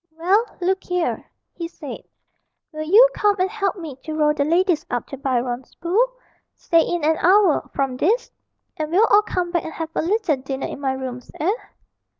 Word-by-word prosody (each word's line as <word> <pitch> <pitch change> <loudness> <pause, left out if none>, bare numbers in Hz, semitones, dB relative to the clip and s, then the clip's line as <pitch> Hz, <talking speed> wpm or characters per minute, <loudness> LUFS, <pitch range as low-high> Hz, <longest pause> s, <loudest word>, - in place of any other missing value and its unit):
'Well, 380 +7 +3 0.2
look 375 +1 0
here,' 360 -1 -2 0.2
he 335 - -5
said, 310 -4 -8 0.7
'will 310 -1 -6
you 410 +11 +7
come 415 -1 +2
and 375 +1 0
help 400 -3 -1
me 320 -8 -8
to 310 +3 -7
row 300 -1 +3
the 290 - 0
ladies 340 +2 +2
up 245 - -2
to - - -5
Byron's 250 -2 -2
Pool 430 +9 +1 0.4
say 335 -2 +3
in 345 -1 -2
an 315 +1 +3
hour 375 -2 +3
from 270 -2 -1
this 445 - +1 0.5
and 310 -2 -3
we'll 380 +7 +4
all 415 - +7
come 360 -4 -3
back 345 -1 0
and 320 - -7
have 325 -1 -4
a - - 0
little 370 -3 +1
dinner 265 +1 -4
in - - -6
my 265 -1 0
rooms, 255 -2 -6
eh?' 355 +7 +2
330 Hz, 190 wpm, -22 LUFS, 285-380 Hz, 0.7 s, you